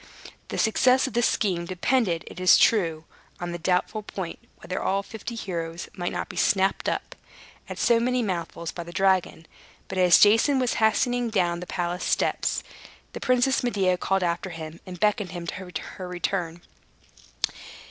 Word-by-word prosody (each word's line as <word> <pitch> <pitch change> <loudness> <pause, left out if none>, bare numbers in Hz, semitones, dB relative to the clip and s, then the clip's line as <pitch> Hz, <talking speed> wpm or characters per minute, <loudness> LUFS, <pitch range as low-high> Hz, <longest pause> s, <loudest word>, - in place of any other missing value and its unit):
The - - -5
success 250 +3 +3
of - - -5
this 240 0 +3
scheme 180 -5 0
depended, 185 -1 0
it - - -10
is 185 -1 +7
true, 165 -8 +3 0.4
on 175 -1 -4
the 175 - -5
doubtful 180 +5 0
point 190 -4 -6 0.2
whether 180 - -5
all 195 +1 0
the - - -19
fifty 225 +2 -7
heroes 170 -5 -5
might 175 -1 -3
not - - -3
be - - -10
snapped 195 -1 +2
up, - - -4 0.5
at - - -6
so 235 -1 +3
many 250 +1 +1
mouthfuls, 170 -4 -3
by 175 - -6
the 170 - -10
dragon. 190 -3 +1 0.4
But, 185 - -3
as 180 -2 +7
Jason 225 +7 +5
was 255 -2 +1
hastening 245 +2 +2
down 175 -5 +1
the 180 - -7
palace 175 0 -2
steps, - - 0 0.5
the - - -5
Princess 255 +1 +2
Medea 195 -7 +2
called 195 +1 0
after 175 +2 -1
him, 165 -1 -8
and 180 -1 -8
beckoned 210 -2 +1
him 175 -1 -6
to 185 +1 -6 0.3
return. 175 -1 -3
185 Hz, 170 wpm, -25 LUFS, 175-220 Hz, 0.5 s, is